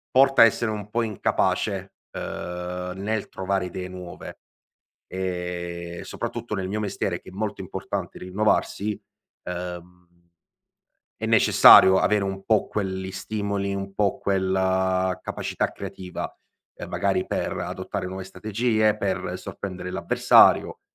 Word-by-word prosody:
porta 135 -2 +7
a - - +10
essere 115 0 +1
un 105 -1 -6
po' 120 - +1
incapace, 100 -2 -1 0.2
uhm, 90 +1 -5
nel 105 +2 -2
trovare 95 -1 -1
idee 90 +1 -6
nuove 90 -1 -9 0.7
e 90 -2 -4
soprattutto 120 -2 -5
nel 95 -1 -3
mio 105 +2 -2
mestiere, 105 -2 -2
che - - -13
è - - -16
molto 105 +1 -3
importante 95 -1 -5
rinnovarsi, 105 +2 0 0.4
uhm, 90 0 -7 1.1
è - - -4
necessario 95 0 +8
avere 105 -1 +2
un 95 0 -4
po' 110 -3 +2
quelli 95 -2 -3
stimoli, 100 0 -2
un 95 0 -5
po' 100 -2 +1
quella 95 -1 +1
capacità - - -2
creativa, 95 -2 -6 0.4
ehm, - - -8
magari, 95 -2 0
per - - -2
adottare - - -4
nuove 95 +1 -6
strategie, 110 +3 0
per 95 -2 -2
sorprendere 90 -1 -6
l'avversario. 95 -1 +4
95 Hz, 125 wpm, -25 LUFS, 90-105 Hz, 1.1 s, a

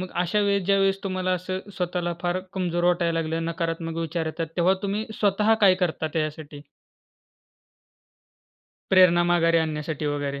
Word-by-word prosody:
मग 185 - -4
अशा 180 +4 0
वेळेस, 200 -1 +1
ज्यावेळेस 195 -1 +2
तुम्हाला 185 -1 -1
असं 185 +1 -3 0.2
स्वतःला 175 -1 -2
फार 175 +1 0
कमजोर 175 -2 -1
वाटायला 170 -2 +2
लागलं, 165 +1 -2
नकारात्मक 165 0 -3
विचार 165 0 -3
येतात, 165 +1 -3
तेव्हा 180 +2 +3
तुम्ही 205 +2 -2
स्वतः 210 +2 +3
काय 190 -2 +6
करता 175 -3 -1
त्याच्यासाठी? 155 -2 -4 2.3
प्रेरणा 180 -2 +6
माघारी 165 -1 +3
आणण्यासाठी 155 -1 -3
वगैरे. 145 -1 -2
175 Hz, 140 wpm, -24 LUFS, 165-185 Hz, 2.3 s, काय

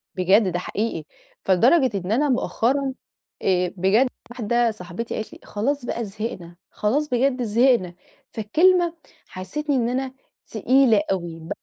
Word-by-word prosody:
بجد 190 +2 +3
ده 175 - -2
حقيقي، 215 +5 -3 0.4
فلدرجة 255 - +4
إن 185 +1 -4
أنا 285 +6 +2
مؤخرًا 265 +2 0 0.5
آآ، 180 -2 +1
بجد 200 +8 +3 0.2
واحدة 235 0 +1
صاحبتي 185 +2 -6
قالت 220 - -5
لي: - - -13
"خلاص 255 +5 -2
بقى 235 -1 -3
زهقنا، 195 -4 -6 0.2
خلاص 285 +9 0
بجد 250 0 +1
زهقنا" 230 -5 +2 0.4
فالكلمة 340 - +3 0.3
حسّستني 275 +11 -3
إن 235 -2 +1
أنا 260 +1 -2 0.3
تقيلة 230 0 +3
أوي 170 -3 -4
230 Hz, 130 wpm, -23 LUFS, 190-265 Hz, 0.5 s, فلدرجة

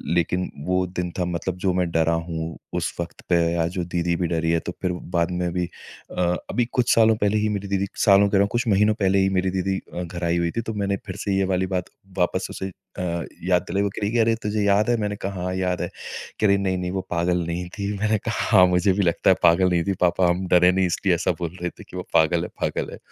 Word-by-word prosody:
लेकिन 90 +2 0 0.2
वो 90 0 +1
दिन 90 -1 -3
था, 90 - +1
मतलब 85 +1 -3
जो 95 -2 +2
मैं 90 -1 0
डरा 80 0 +2
हूँ 80 -1 -4 0.2
उस - - -1
वक़्त 85 -1 -5
पे 90 - +4 0.2
या 85 -1 +1
जो 90 +1 -3
दीदी 85 0 -1
भी 90 - 0
डरी 80 -1 0
है। 85 - +2
तो 90 - -5
फ़िर 90 - 0
वो 90 - -5
बाद 85 0 +1
में 90 -1 -1
भी 90 -1 0
अ, 90 +1 -7 0.3
अभी 120 - +1
कुछ 125 -1 +3
सालों 110 -1 +5
पहले 105 0 +1
ही 105 0 +1
मेरी 100 -1 -3
दीदी, 100 0 0
सालों 100 0 +5
कह 100 - +2
रहा - - +5
हूँ 100 - -1
कुछ 120 +1 -1
महीनों 105 +1 +4
पहले 100 -2 +2
ही 95 0 +3
मेरी 95 +1 +1
दीदी 95 +1 -1 0.2
अ, 90 - -3
घर 85 0 -7
आई 85 0 +1
हुई 85 -1 0
थी। - - +2
तो 110 0 -5
मैंने 100 -1 -1
फ़िर - - -6
से 100 -2 0
ये 95 - +2
वाली 95 +1 0
बात 90 -1 -2 0.3
वापस 90 - +1
उसे 95 - -4
अ, 85 -2 -5 0.2
याद 90 -1 +2
दिलाई। 100 - +1
वो 100 - +1
कह - - -5
रही 100 - 0
कि, 120 - 0
"अरे 115 0 +3
तुझे 105 0 0
याद 100 +3 +3
है?" 120 - +3
मैंने 105 0 -1
कहा, 95 -2 -5
"हाँ, 90 0 -2
याद 90 -1 -1
है।" - - -2 0.5
कह 110 - +3
रही 100 0 +4
नहीं-नहीं 95 -2 -1
वो 95 0 -2
पागल 85 0 +1
नहीं 85 +1 -3
थी। 100 0 -2
मैंने 110 +1 +2
कहा - - +1
हाँ, 90 - +9
मुझे 90 +2 +3
भी 100 +2 +1
लगता 85 +2 +2
है - - +5
पागल 85 +2 +5
नहीं 85 -2 +1
थी। 100 - +1
पापा 90 0 +3
हम 90 +2 -1
डरे 90 0 +5
नहीं 95 0 +2
इसलिए 90 +1 +1
ऐसा 85 - 0
बोल 85 +1 -4
रहे 90 - -1
थे - - -14
की - - -8
वो - - -6
पागल 85 +2 +3
है - - -3
पागल - - -1
है। - - -8
90 Hz, 270 wpm, -23 LUFS, 85-100 Hz, 0.5 s, हाँ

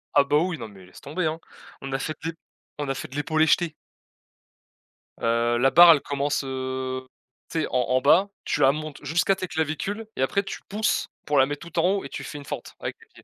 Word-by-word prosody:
Ah 145 - +7
bah, 145 +1 +2
oui, 170 +1 0
non - - -6
mais 95 -3 -15
laisse 90 - -15
tomber, 160 +5 -3
hein. 160 +1 -1 0.4
On 135 - -6
a 135 - 0
fait 155 +3 -3
des 165 +1 -2 0.4
on 145 -1 -3
a 135 - 0
fait - - -5
de 130 - -12
l'épaulé-jeté. 155 +2 +2 1.5
Heu, 115 +1 +2
la 130 +3 +4
barre, 175 0 +10
elle 145 - 0
commence, 145 0 -1
heu, 130 -1 -4 0.4
tu 165 - -2
sais - - -1
en 125 - +2
en 130 0 +3
bas. 180 +9 +5 0.2
Tu - - -1
la 135 - +7
montes 155 0 -6
jusqu'à 175 +4 +2
tes 185 - -4
clavicules 160 +8 -2
et - - -3
après, 200 +9 +1
tu - - -7
pousses 210 +2 0 0.2
pour 145 - +1
la 135 - +7
mettre 145 +4 -6
tout 170 +1 -2
en 175 +2 +4
haut - - -4
et 140 - -7
tu - - -6
fais - - -7
une 140 - -11
fente - - -7
avec - - -5
tes - - -20
pieds. - - -17
145 Hz, 235 wpm, -25 LUFS, 130-165 Hz, 1.5 s, barre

